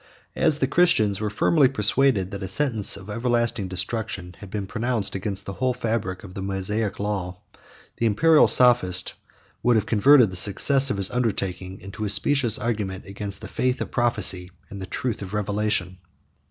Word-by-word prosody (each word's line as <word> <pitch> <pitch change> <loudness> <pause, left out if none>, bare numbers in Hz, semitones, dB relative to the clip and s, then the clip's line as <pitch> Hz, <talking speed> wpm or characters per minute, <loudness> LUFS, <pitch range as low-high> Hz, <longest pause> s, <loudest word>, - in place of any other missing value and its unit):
70 - - -11
As 155 -2 +3
the 135 - 0
Christians 120 - +2
were 105 - -2
firmly 135 +6 +2
persuaded 105 -4 +1
that 100 -1 -7
a 95 - -4
sentence 110 -1 +1
of 100 -1 -13
everlasting 115 -2 -1
destruction 95 0 -4
had 100 - -11
been 100 0 -5
pronounced 115 0 -1
against 100 0 -2
the 100 - -6
whole 130 +3 -2
fabric 110 -5 -3
of 95 -3 -11
the 95 - -7
Mosaic 100 +2 -3
law, 95 -3 -4 0.6
the 115 - 0
Imperial 155 +9 +4
sophist 120 -8 +4 0.5
would 120 -1 +2
have 110 -1 +1
converted 120 0 +4
the - - -8
success 135 +9 +3
of 115 - -2
his 100 -1 +1
undertaking 95 -6 -3
into 100 +2 -8
a 105 - -2
specious 115 +3 +4
argument 105 -5 -4
against 100 0 -4
the - - -8
faith 125 0 -2
of - - -5
prophecy, 105 -7 +1 0.2
and 100 0 -8
the 95 - -7
truth 125 +3 -4
of 100 +1 -7
revelation. 105 -3 -2
105 Hz, 180 wpm, -23 LUFS, 95-120 Hz, 0.6 s, Imperial